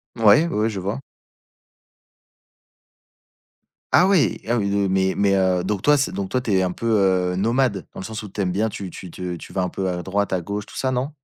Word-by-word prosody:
Mouais, 115 +8 +5
oui, - - -3
oui, 115 - +2
je 100 -3 -4
vois. 100 +7 -3 2.9
Ah 180 - +6
oui, 190 -7 +2
ah 120 - +1
oui, 100 -3 0
heu 100 -1 +1
mais 95 0 +1
mais 100 -1 +3
heu, 95 -2 +2
donc 100 0 -2
toi, 150 0 +4
c'est 140 - 0
donc 95 -1 -4
toi, 130 - 0
tu 110 - -3
es 95 - +3
un 90 -1 0
peu, 115 - -7 0.5
heu, - - -3
nomade? 115 0 0
Dans - - -7
le - - -6
sens 110 0 -6
où 105 - -9
tu 100 - -10
aimes 95 -2 +1
bien 110 +4 0
tu 95 -3 -7
tu 90 - -9
te 90 +1 -5
tu 85 - -11
vas 95 0 -1
un 90 - -1
peu 95 -1 -3
à 90 -1 -3
droite, 100 +1 -1
à 90 -2 0
gauche, 100 +3 -5
tout - - -13
ça, 130 -1 0
non? 130 +3 -1
100 Hz, 240 wpm, -22 LUFS, 95-115 Hz, 2.9 s, Ah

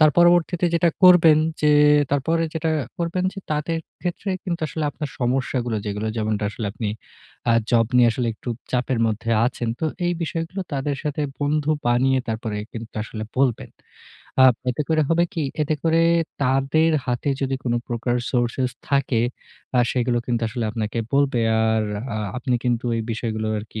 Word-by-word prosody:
তার 155 -1 +7
পরবর্তীতে 175 0 +4
যেটা 170 0 +3 0.2
করবেন 165 -4 +8 0.2
যে 150 - +5 0.4
তারপরে 165 +4 +1
যেটা 160 0 0 0.3
করবেন 175 +2 -1 0.3
তাদের 160 +2 -1 0.2
ক্ষেত্রে 180 +2 -3
কিন্তু 170 -3 -3
আসলে 160 -2 -3
আপনার 150 0 -5
সমস্যাগুলো 125 -2 0
যেগুলো 105 +2 -3
যেমনটা 110 -1 -1
আসলে 110 0 -5
আপনি 110 -1 -3 0.6
আ - - +5 0.2
জব 115 -2 +4
নিয়ে 120 -1 +6
আসলে 125 -1 -2
একটু 120 - -10 0.2
চাপের 125 -1 0
মধ্যে 110 +1 -2 0.2
আছেন। 120 -2 -3
তো - - 0 0.2
এই 175 - +1
বিষয়গুলো 165 +4 -3
তাদের 140 0 -1
সাথে 150 0 -2 0.2
বন্ধু 150 +1 +1 0.2
বানিয়ে 130 +2 +3
তারপরে 110 -1 -3 0.2
কিন্তু 115 -1 -8
আসলে 110 0 -6
বলবেন। 130 -3 +1 0.7
আ - - +9 0.3
এতে 135 +5 -2
করে 155 -1 +3
হবে 170 +1 +3
কি? 160 - -1 0.2
এতে 155 +1 0
করে 165 0 +3 0.4
তাদের 135 +5 +2 0.2
হাতে 125 +3 -1
যদি 135 0 0
কোন 120 - 0 0.2
প্রকার 120 +1 -1 0.2
সোর্সেস 125 +1 0 0.2
থাকে 140 -4 +1 0.6
আ - - +4
সেগুলো 120 -1 +1
কিন্তু 120 -1 -1
আসলে 115 +1 -3
আপনাকে 110 +1 -3 0.2
বলবে। 140 -4 +2 0.2
আর 110 -1 +2 0.3
আ - - -2 0.2
আপনি 125 0 -1
কিন্তু 120 0 0
এই 115 - -1
বিষয়গুলো 110 -1 -3
আরকি 110 +1 -7
130 Hz, 160 wpm, -22 LUFS, 115-155 Hz, 0.7 s, আ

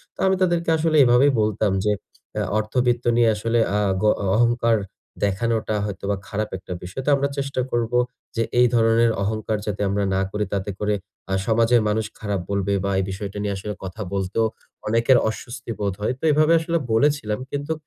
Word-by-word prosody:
তো - - -29
আমি 190 - +3
তাদেরকে 175 -2 +1
আসলে 160 0 +1
এভাবেই 125 +3 +5
বলতাম 105 -1 +1
যে, 105 - +3 0.5
আ - - 0 0.2
"অর্থবৃত্ত 120 +2 0
নিয়ে 120 -1 +5
আসলে 115 +3 0 0.2
আ - - +2 0.3
অ - - +6 0.3
অহংকার 115 0 +3 0.5
দেখানোটা 110 +2 0
হয়তোবা 100 0 -3
খারাপ 105 +1 -3
একটা 95 0 -7
বিষয়। 95 +9 -5
তো - - +1
আমরা 140 0 0
চেষ্টা 140 -2 -1
করবো 120 0 0 0.4
যে, 115 - +1 0.2
এই 125 - +6
ধরনের 115 0 +4
অহংকার 110 +1 -1
যাতে 105 -1 -3
আমরা 100 +1 0
না 95 - +1
করি। 105 +1 -1
তাতে 100 0 -2
করে 105 0 +1 0.4
আ - - +1
সমাজের 115 +1 +4
মানুষ 110 +1 0
খারাপ 100 -3 -2
বলবে 100 0 0
বা, 100 - 0
এই - - +1
বিষয়টা 100 +1 -6
নিয়ে 100 -1 -1
আসলে 105 +2 -5
কথা 95 +3 -6
বলতেও 100 +3 0 0.4
অনেকের 115 +4 +4
অস্বস্তি 120 +3 -7
বোধ 100 -2 -1
হয়।" 105 - 0
তো - - -22
এভাবে 155 +2 +4
আসলে 165 +1 -1 0.2
বলেছিলাম। 120 -3 +1
কিন্তু 145 +2 -2
110 Hz, 180 wpm, -23 LUFS, 105-125 Hz, 0.5 s, অ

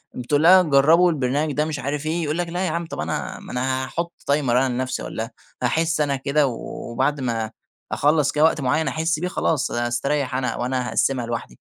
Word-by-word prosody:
بتقول 145 +5 0
لها 185 +2 +8
جرّبوا 160 +3 +5
البرنامج 145 +1 0
ده 150 +1 +1
مش 150 -2 -4
عارف 145 +2 -3
إيه، 165 +2 -1
يقول 150 +2 -1
لك 175 - -1
لأ 180 +2 -2
ياعم، 170 0 -2
طَب 160 - -7
أنا 80 +1 -3
ما - - -10
أنا 130 +1 -1
هاحُطّ 170 +5 -3 0.2
timer 140 -3 +1
أنا 130 +2 +3
لنفسي، 130 +1 -2
والّا 115 +2 -4 0.3
هاحس 160 +5 +1
أنا 140 -2 +1
كده، 140 +2 +1
وبعد 130 +3 -3
ما 115 -3 -2 0.4
أخلّص 145 0 +2
كده 150 +1 +1
وقت 160 -1 +3
معيّن 145 +4 +1
أحس 160 +3 0
بيه، 180 - -1
خلاص 155 -5 0
هاستريّح 130 +3 -1
أنا، 130 -1 -1
وأنا 125 0 -1
هاقسّمها 130 -3 +1
لوحدي. 115 - -4
140 Hz, 195 wpm, -22 LUFS, 125-155 Hz, 0.4 s, لها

